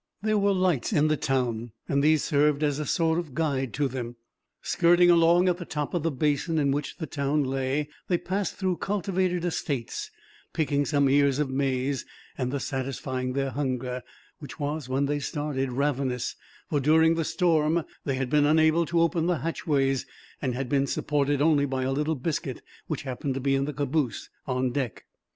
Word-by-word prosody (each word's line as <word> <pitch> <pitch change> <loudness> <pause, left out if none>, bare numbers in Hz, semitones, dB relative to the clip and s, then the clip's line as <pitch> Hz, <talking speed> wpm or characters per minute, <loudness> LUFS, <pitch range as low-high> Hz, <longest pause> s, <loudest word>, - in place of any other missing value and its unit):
There 215 -1 +2
were 200 0 +3
lights 185 - +1
in 155 -5 +3
the 155 - +3
town, 120 -6 -1
and 140 0 +1
these 155 0 +4
served 150 0 +2
as 145 -1 +1
a 150 - -3
sort 165 -1 +2
of 155 -7 -7
guide 140 -5 0
to 145 0 +1
them. 120 -2 -5 0.5
Skirting 175 +1 +4
along 170 +2 +5
at 180 -1 +2
the 175 - -6
top 150 -3 -3
of 175 - 0
the 165 - +1
basin 150 +3 0
in 140 -2 +2
which 145 +1 -3
the 160 - -4
town 145 0 0
lay, 135 +2 -1 0.2
they 175 - +2
passed 195 +3 -2
through 185 -3 -1
cultivated 185 -3 -1
estates, 140 -8 -3 0.4
picking 145 -2 +1
some 140 -2 +3
ears 140 0 +3
of 145 -3 -1
maize; 135 0 0 0.3
thus 130 +1 -2
satisfying 130 -1 -3
their 135 0 -1
hunger, 130 -2 -2 0.4
which 145 - -10
was, 145 -2 -3
when 135 +2 +1
they 145 +1 -1
started, 145 -3 -2
ravenous; 130 -2 -1 0.3
for, 145 - 0
during 160 +3 +4
the 165 0 0
storm, 165 -2 +2 0.2
they 135 - -1
had 130 -1 -2
been 150 -1 +4
unable 160 +2 +4
to 170 -1 +2
open 165 0 +1
the 180 -3 0
hatchways, 135 -5 0 0.3
and 130 -3 -1
had 135 0 -3
been 140 +1 +1
supported 145 0 0
only 150 -3 +3
by 130 -1 -2
a 130 - 0
little 150 +3 0
biscuit, 150 +3 -3 0.2
which - - -3
happened 130 0 -3
to - - -2
be 135 +1 +1
in 135 0 +1
the 150 - -4
caboose 140 -3 -1 0.2
on 130 -1 0
deck. 125 -6 -3
145 Hz, 185 wpm, -27 LUFS, 135-160 Hz, 0.5 s, along